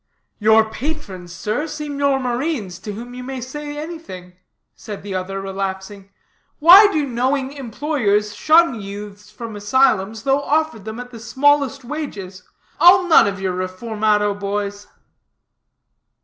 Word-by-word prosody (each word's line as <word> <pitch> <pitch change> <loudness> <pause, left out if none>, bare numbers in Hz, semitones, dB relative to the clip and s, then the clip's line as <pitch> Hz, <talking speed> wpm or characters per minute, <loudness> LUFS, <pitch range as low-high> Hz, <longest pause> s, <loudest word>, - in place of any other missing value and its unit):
"Your 220 +1 +4
patrons, 220 - -6
sir, 215 - -3
seem 300 -2 -6
your 280 -1 +2
marines 245 - -3
to 210 +2 -7
whom 240 +4 -8
you 250 - -7
may 265 0 -5
say 290 +4 -7
anything," 300 - -8 0.4
said 210 -3 -9
the 200 -1 -6
other, 190 +1 -3
relapsing. 195 0 -5 0.5
"Why 380 +6 +8
do 305 -4 0
knowing 265 +2 -1
employers 230 -6 -1
shun 310 -4 +3
youths 205 +1 -9
from 220 +1 -8
asylums, 215 -1 +1
though 275 +1 +2
offered 295 -8 -1
them 220 +2 -6
at 245 0 -8
the 230 - -10
smallest 275 +3 +1
wages? 210 -10 -6 0.4
I'll 365 +1 +7
none 320 - +6
of 195 -1 -3
your 190 -1 -2
reformado 210 +3 0
boys." 205 0 -4
230 Hz, 135 wpm, -20 LUFS, 200-285 Hz, 0.5 s, Why